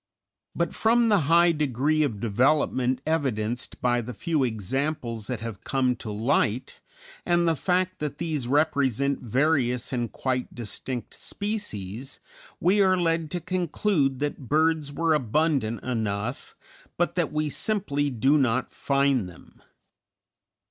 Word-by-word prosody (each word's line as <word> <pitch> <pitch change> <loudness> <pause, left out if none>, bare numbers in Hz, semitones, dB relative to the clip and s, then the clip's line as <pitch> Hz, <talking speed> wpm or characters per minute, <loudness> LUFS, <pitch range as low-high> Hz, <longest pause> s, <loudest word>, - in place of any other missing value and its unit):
But - - -1
from 230 +1 +3
the 205 -2 +5
high 170 +1 +6
degree 150 0 +1
of 125 -9 0
development 130 +2 +1
evidenced 125 -7 -1
by 120 -1 +2
the 120 +1 -7
few 155 +3 0
examples 120 - -2
that 125 -4 -4
have 115 -4 -6
come 130 -2 +1
to 115 - -7
light, 115 +2 0 0.4
and 175 -1 +2
the 165 - +3
fact 185 +3 0
that 150 -1 -4
these 155 -6 -2
represent 140 -2 +1
various 125 0 +1
and 120 -2 -1
quite 130 -1 -2
distinct 120 +1 -5
species, 135 - -4 0.4
we 195 +4 +3
are 185 -1 +4
led 165 -2 0
to 175 - -2
conclude 170 -4 0
that 145 -3 -3
birds 155 -1 +2
were 165 +2 +1
abundant 135 -3 0
enough, 110 -1 -3 0.4
but 175 0 +1
that 175 -3 0
we 150 -1 -1
simply 145 -10 0
do 135 +4 +3
not 130 -1 +1
find 140 -7 +1
them. 85 - -17
140 Hz, 135 wpm, -26 LUFS, 120-160 Hz, 0.4 s, high